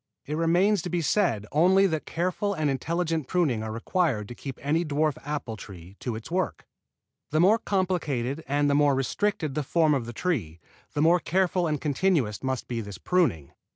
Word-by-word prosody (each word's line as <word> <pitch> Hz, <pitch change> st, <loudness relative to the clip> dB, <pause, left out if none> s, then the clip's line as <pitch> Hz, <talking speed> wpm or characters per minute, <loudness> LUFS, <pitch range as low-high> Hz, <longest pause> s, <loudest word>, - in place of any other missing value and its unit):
It 150 Hz, -, -3 dB
remains 175 Hz, +5 st, +3 dB
to 180 Hz, -, -5 dB
be 175 Hz, -1 st, -1 dB
said 145 Hz, -, +1 dB
only 185 Hz, +6 st, +5 dB
that 160 Hz, -5 st, -1 dB
careful 185 Hz, +4 st, -1 dB
and 155 Hz, -3 st, 0 dB
intelligent 165 Hz, +2 st, -1 dB
pruning 155 Hz, -11 st, +1 dB
are 110 Hz, 0 st, -4 dB
required 115 Hz, -, 0 dB
to -, -, -6 dB
keep 135 Hz, +1 st, -7 dB
any 155 Hz, +5 st, +1 dB
dwarf 150 Hz, -1 st, 0 dB
apple 145 Hz, -6 st, -4 dB
tree 95 Hz, -2 st, -11 dB
to 120 Hz, -3 st, -3 dB
its 110 Hz, +7 st, -8 dB
work. 185 Hz, 0 st, -2 dB, 0.6 s
The 155 Hz, -, +1 dB
more 200 Hz, +7 st, +5 dB
complicated 165 Hz, -, -1 dB
and 145 Hz, +1 st, +1 dB
the 145 Hz, -, +2 dB
more 145 Hz, -1 st, +4 dB
restricted 155 Hz, -, -1 dB
the 150 Hz, -, -1 dB
form 155 Hz, +2 st, +2 dB
of 125 Hz, -5 st, -1 dB
the -, -, -5 dB
tree, 110 Hz, -, -2 dB, 0.4 s
the 145 Hz, -, +2 dB
more 170 Hz, +2 st, +5 dB
careful 180 Hz, 0 st, +1 dB
and 150 Hz, -2 st, -1 dB
continuous 145 Hz, -, 0 dB
must 130 Hz, -2 st, -2 dB
be 120 Hz, -2 st, -3 dB
this 100 Hz, -3 st, -8 dB
pruning. 115 Hz, -, 0 dB
150 Hz, 190 wpm, -26 LUFS, 130-175 Hz, 0.6 s, only